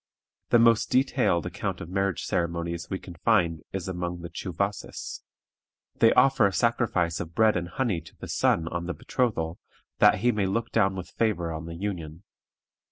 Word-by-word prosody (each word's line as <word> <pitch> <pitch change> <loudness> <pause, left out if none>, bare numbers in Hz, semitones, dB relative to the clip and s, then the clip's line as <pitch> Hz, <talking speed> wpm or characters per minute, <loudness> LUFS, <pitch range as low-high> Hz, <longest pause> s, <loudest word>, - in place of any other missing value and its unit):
The - - +6
most 115 -1 +4
detailed 125 - +2
account - - -3
of 85 - -7
marriage 95 -1 -1
ceremonies 85 0 -2
we 95 - -2
can 90 - -11
find 85 -6 +2
is 95 -1 -4
among 90 -1 -4
the 85 - -8
Tschuwasses. 100 +2 -4 0.8
They 115 - +6
offer 130 -4 +5
a - - -2
sacrifice 95 -9 +1
of 85 0 -6
bread 110 -1 +4
and 90 -1 -2
honey 105 -5 -1
to - - -16
the - - -8
sun 80 0 +1
on 85 0 -4
the 90 - -3
betrothal, 85 -10 -1 0.4
that - - +7
he 120 +2 +4
may 105 -4 0
look 115 +4 -2
down 95 -4 +2
with 90 -1 -7
favor 90 -8 0
on 80 +1 -6
the 85 - -6
union. 85 -3 -5
90 Hz, 175 wpm, -27 LUFS, 85-110 Hz, 0.8 s, that